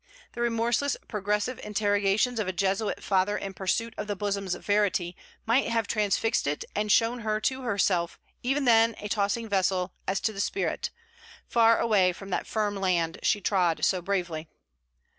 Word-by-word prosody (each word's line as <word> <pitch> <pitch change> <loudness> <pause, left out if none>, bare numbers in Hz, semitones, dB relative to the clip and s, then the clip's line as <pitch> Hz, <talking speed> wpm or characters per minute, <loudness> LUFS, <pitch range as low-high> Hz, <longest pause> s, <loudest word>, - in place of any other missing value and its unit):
The 235 - -5
remorseless 235 +4 +1
progressive 210 +3 -1
interrogations 205 +3 +1
of 210 - -1
a - - 0
Jesuit 195 +3 -1
Father 195 +1 +1
in 195 -1 -5
pursuit 225 +5 -1
of - - -3
the 205 - -2
bosom's 200 -2 -2
verity 200 -4 0 0.3
might 235 +5 +2
have 230 -1 0
transfixed 210 -3 0
it 145 +1 -2
and 210 0 0
shown 230 +3 +3
her 215 -1 -1
to 260 +3 0
herself 195 -7 0 0.2
even 270 +3 0
then 230 -1 +5
a 210 - -6
tossing 205 +2 -1
vessel 190 -2 0
as 190 +1 0
to 220 - 0
the 195 - -8
spirit, 395 - -1 0.6
far 230 -1 +4
away 195 -5 +3
from 195 +2 -10
that - - -2
firm 210 -2 -1
land 175 -4 0
she 205 -1 +1
trod 180 -6 +1
so 185 -2 +1
bravely. 175 -4 -2
205 Hz, 165 wpm, -27 LUFS, 190-225 Hz, 0.6 s, then